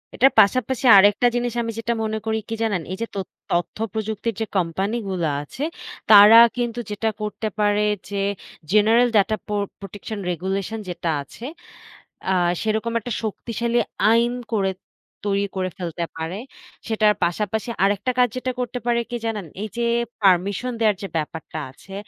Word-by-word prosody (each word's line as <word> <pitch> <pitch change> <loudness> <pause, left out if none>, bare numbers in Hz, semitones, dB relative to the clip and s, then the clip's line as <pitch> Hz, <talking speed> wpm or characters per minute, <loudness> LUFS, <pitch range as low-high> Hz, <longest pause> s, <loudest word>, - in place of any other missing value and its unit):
এটার 270 +2 +5
পাশাপাশি 255 +5 +3
আরেকটা 205 +5 +5
জিনিস, 240 -1 -1
আমি 230 -1 -3
যেটা 235 +1 -1
মনে 220 0 -1
করি 220 0 0
কি 225 - -2
জানেন? 200 -6 0
এই 190 - -4
যে - - +1
তত 195 - -3 0.2
তথ্য 175 +4 -1 0.2
প্রযুক্তির 220 +1 -2
যে - - +1
কোম্পানি 190 +6 -1
গুলা 170 -5 -1
আছে, 245 - -7 0.5
তারা 210 +2 +10 0.2
কিন্তু 240 -1 -2
যেটা 210 +2 -1
করতে 210 +1 -3
পারে 205 0 +2 0.3
যে, 200 -1 -2 0.5
General 225 +4 +5
data 215 +2 +3
পোর 210 -1 -1 0.2
Protection 205 +2 -7
Regulation 195 +5 -3
যেটা 175 -1 -3
আছে, 230 - -11 0.9
আ - - +3 0.3
সেরকম 220 +1 -1
একটা 245 +3 -7
শক্তিশালী 235 +2 -2 0.3
আইন 235 +1 +3 0.2
করে, 195 -3 +1 0.6
তৈরি 200 0 +1
করে 185 -1 -1
ফেলতে 170 -2 -4
পারে। 160 +4 -4 0.5
সেটার 215 -2 +3
পাশাপাশি 210 +5 -1
আরেকটা 205 +4 +1
কাজ 250 0 +5
যেটা 255 0 -2
করতে 245 0 -3
পারে, 235 -1 +2
কি 240 - -3
জানেন? 215 -5 -2 0.2
এই 215 - -2
যে 235 - 0 0.4
পারমিশন 195 +6 +2
দেওয়ার 215 -3 +3
যে 195 - -3
ব্যাপারটা 160 0 -5
আছে, 195 +8 -15
210 Hz, 160 wpm, -22 LUFS, 195-230 Hz, 0.9 s, তারা